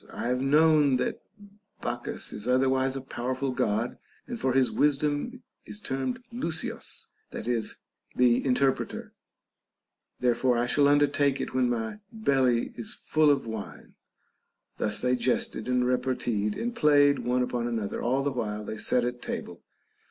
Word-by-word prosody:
I 120 Hz, -, -3 dB
have 125 Hz, +1 st, 0 dB
known 150 Hz, 0 st, +4 dB
that -, -, -2 dB, 0.6 s
Bacchus 120 Hz, 0 st, -4 dB
is 105 Hz, +3 st, -6 dB
otherwise 130 Hz, +1 st, +2 dB
a 135 Hz, -, -3 dB
powerful 130 Hz, +1 st, -3 dB
God, 120 Hz, -2 st, -1 dB, 0.3 s
and 240 Hz, -2 st, -6 dB
for 130 Hz, -, +1 dB
his 130 Hz, -1 st, +3 dB
wisdom 150 Hz, -, 0 dB, 0.2 s
is 210 Hz, -, -5 dB
termed 130 Hz, -8 st, -2 dB, 0.2 s
λύσιος, 170 Hz, -10 st, -4 dB, 0.2 s
that 110 Hz, -, -6 dB
is, 120 Hz, -3 st, -1 dB, 0.4 s
the 125 Hz, -1 st, +4 dB
interpreter 135 Hz, 0 st, +1 dB
J -, -, -22 dB, 1.1 s
therefore 125 Hz, 0 st, +2 dB
I 120 Hz, -, +1 dB
shall 140 Hz, +3 st, +3 dB
undertake 145 Hz, -1 st, +3 dB
it -, -, -4 dB
when 130 Hz, -1 st, +2 dB
my 115 Hz, -, -2 dB
belly 135 Hz, -, +1 dB
is 115 Hz, -, -6 dB
full 155 Hz, -1 st, +2 dB
of 140 Hz, -3 st, +2 dB
wine. 110 Hz, -3 st, -7 dB, 0.8 s
Thus 105 Hz, -1 st, -1 dB
they 125 Hz, 0 st, +2 dB
jested 125 Hz, -2 st, -1 dB
and 125 Hz, 0 st, +2 dB
reparteed 125 Hz, -4 st, 0 dB
and 240 Hz, +1 st, -3 dB
played 145 Hz, -5 st, +5 dB
one 125 Hz, +1 st, +1 dB
upon 120 Hz, -1 st, -2 dB
an 120 Hz, -1 st, -1 dB
other 105 Hz, -2 st, -3 dB
all 130 Hz, +3 st, +1 dB
the 145 Hz, -, 0 dB
while 105 Hz, -4 st, -3 dB
they 110 Hz, -, -5 dB
sat 120 Hz, +3 st, +1 dB
at 120 Hz, 0 st, -4 dB
table. -, -, -5 dB
130 Hz, 155 wpm, -28 LUFS, 120-140 Hz, 1.1 s, played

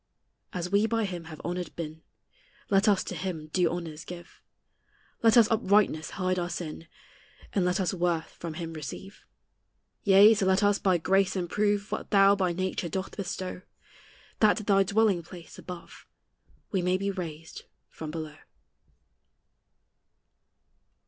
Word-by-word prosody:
As 180 Hz, -3 st, -4 dB
we 205 Hz, +2 st, +3 dB
by 225 Hz, -1 st, 0 dB
him 175 Hz, -4 st, -5 dB
have 160 Hz, -2 st, -10 dB
honored 175 Hz, 0 st, -4 dB
been, 160 Hz, -1 st, -6 dB, 0.7 s
Let 195 Hz, +1 st, +4 dB
us 200 Hz, -2 st, +4 dB
to -, -, -6 dB
him 160 Hz, -3 st, -5 dB
due 180 Hz, -3 st, +3 dB
honors 165 Hz, -3 st, -5 dB
give; 175 Hz, -1 st, -11 dB, 0.8 s
Let 230 Hz, +1 st, +5 dB
us 230 Hz, -2 st, +7 dB
uprightness 200 Hz, -7 st, +2 dB
hide 185 Hz, -1 st, 0 dB
our 175 Hz, 0 st, -2 dB
sin, 165 Hz, -2 st, -6 dB, 0.7 s
And 190 Hz, -3 st, +2 dB
let 180 Hz, +2 st, +1 dB
us 185 Hz, -2 st, 0 dB
worth 175 Hz, -3 st, -1 dB
from 165 Hz, -2 st, -5 dB
him 165 Hz, -1 st, -5 dB
receive. 160 Hz, +6 st, -8 dB, 0.8 s
Yea, 200 Hz, +2 st, +8 dB
so 200 Hz, -3 st, 0 dB
let 190 Hz, +2 st, +3 dB
us 205 Hz, 0 st, +3 dB
by 185 Hz, -2 st, +3 dB
grace 195 Hz, +4 st, +2 dB
improve 205 Hz, +3 st, 0 dB
What -, -, -4 dB
thou 200 Hz, -1 st, +6 dB
by 185 Hz, -3 st, +1 dB
nature 185 Hz, 0 st, -2 dB
doth 190 Hz, +4 st, -4 dB
bestow, 185 Hz, -2 st, -5 dB, 0.8 s
That 215 Hz, -1 st, +5 dB
to 215 Hz, -, -4 dB
thy 195 Hz, -1 st, +4 dB
dwelling 200 Hz, -1 st, +2 dB
place 170 Hz, 0 st, -12 dB
above 180 Hz, -2 st, -10 dB, 0.6 s
We 190 Hz, -, +1 dB
may 180 Hz, +1 st, +2 dB
be 200 Hz, +1 st, -1 dB
raised 165 Hz, -4 st, -7 dB, 0.3 s
from 155 Hz, -, -7 dB
below. 155 Hz, -1 st, -6 dB
185 Hz, 150 wpm, -28 LUFS, 170-200 Hz, 0.8 s, Yea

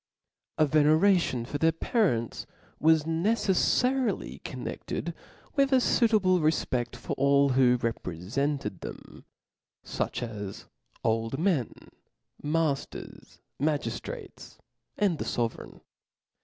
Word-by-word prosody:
A 155 Hz, -, +5 dB
veneration 155 Hz, -2 st, +3 dB
for 145 Hz, +3 st, -4 dB
their 160 Hz, +1 st, +4 dB
parents 160 Hz, -, 0 dB, 0.3 s
was 160 Hz, 0 st, +4 dB
neceflarily 215 Hz, -, +1 dB
connedled -, -, -5 dB, 0.4 s
with 275 Hz, -1 st, +3 dB
a -, -, +6 dB
fuitable 215 Hz, -7 st, +3 dB
refpc^ 130 Hz, -6 st, 0 dB
for -, -, -5 dB
all 140 Hz, 0 st, +4 dB
who 125 Hz, -1 st, +4 dB
repre* 115 Hz, -8 st, -3 dB, 0.2 s
fenced 140 Hz, -8 st, -1 dB
them, -, -, -10 dB, 0.6 s
fuch -, -, -3 dB
as 105 Hz, -3 st, -7 dB, 0.4 s
old 115 Hz, +2 st, 0 dB
men, 160 Hz, -, +1 dB, 0.7 s
mailers, 150 Hz, -2 st, -3 dB, 0.2 s
magiftrates, 145 Hz, -6 st, -3 dB, 0.4 s
and 190 Hz, -7 st, +1 dB
the -, -, -3 dB
fovereign. 115 Hz, -1 st, -3 dB
150 Hz, 100 wpm, -28 LUFS, 125-180 Hz, 0.7 s, a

